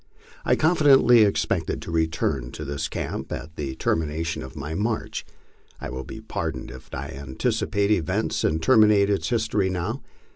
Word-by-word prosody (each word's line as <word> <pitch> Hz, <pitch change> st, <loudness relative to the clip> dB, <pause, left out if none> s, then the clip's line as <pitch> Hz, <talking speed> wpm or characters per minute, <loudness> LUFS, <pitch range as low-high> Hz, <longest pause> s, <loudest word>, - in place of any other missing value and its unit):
I -, -, +3 dB
confidently 140 Hz, -7 st, +5 dB
expected 100 Hz, -2 st, +1 dB
to -, -, -6 dB
return 80 Hz, -6 st, 0 dB
to 75 Hz, -, -6 dB
this 70 Hz, +2 st, -3 dB
camp -, -, -5 dB
at 80 Hz, 0 st, -6 dB
the 70 Hz, -3 st, -4 dB
termination 80 Hz, +1 st, -1 dB
of 65 Hz, +3 st, -9 dB
my 75 Hz, +1 st, -5 dB
march. 110 Hz, +6 st, -2 dB, 0.5 s
I -, -, -6 dB
will 65 Hz, +1 st, -5 dB
be -, -, -8 dB
pardoned -, -, -4 dB
if 65 Hz, -, -12 dB
I 70 Hz, +2 st, -5 dB
anticipate 70 Hz, +9 st, -1 dB
events 90 Hz, -8 st, 0 dB
and 80 Hz, -, +1 dB
terminate 105 Hz, -4 st, +5 dB
its 100 Hz, -, 0 dB
history 105 Hz, -5 st, +1 dB
now. 95 Hz, +8 st, -3 dB
85 Hz, 155 wpm, -24 LUFS, 75-105 Hz, 0.5 s, confidently